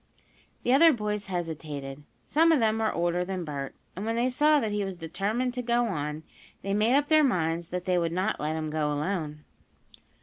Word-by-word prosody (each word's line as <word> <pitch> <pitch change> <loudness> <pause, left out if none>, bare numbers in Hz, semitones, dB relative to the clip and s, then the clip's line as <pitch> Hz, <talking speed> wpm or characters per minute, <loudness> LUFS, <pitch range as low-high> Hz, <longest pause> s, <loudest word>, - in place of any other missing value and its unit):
The 245 - +3
other 325 +4 +7
boys 210 -5 -3
hesitated. 155 -6 -5 0.2
Some 330 +2 +4
of 315 - +4
them 220 -1 +2
were 220 -1 +1
older 175 +1 0
than 185 -1 -4
Bert, 140 -3 -5 0.2
and 190 - -5
when 225 +1 -1
they 245 +2 +1
saw 300 +3 +4
that 220 -6 -2
he 205 0 -1
was 190 -2 -5
determined 200 +9 -2
to 250 - -3
go 240 0 +1
on, 150 -6 -3 0.4
they 195 +1 -1
made 215 +5 +3
up 290 +1 +2
their 310 -1 +5
minds 170 - 0
that 180 +1 -4
they 180 -2 +2
would 165 -1 -1
not 185 +5 -1
let 155 +1 -1
him 155 -1 -3
go 150 -1 0
alone. 150 -1 -3
190 Hz, 205 wpm, -27 LUFS, 160-235 Hz, 0.4 s, other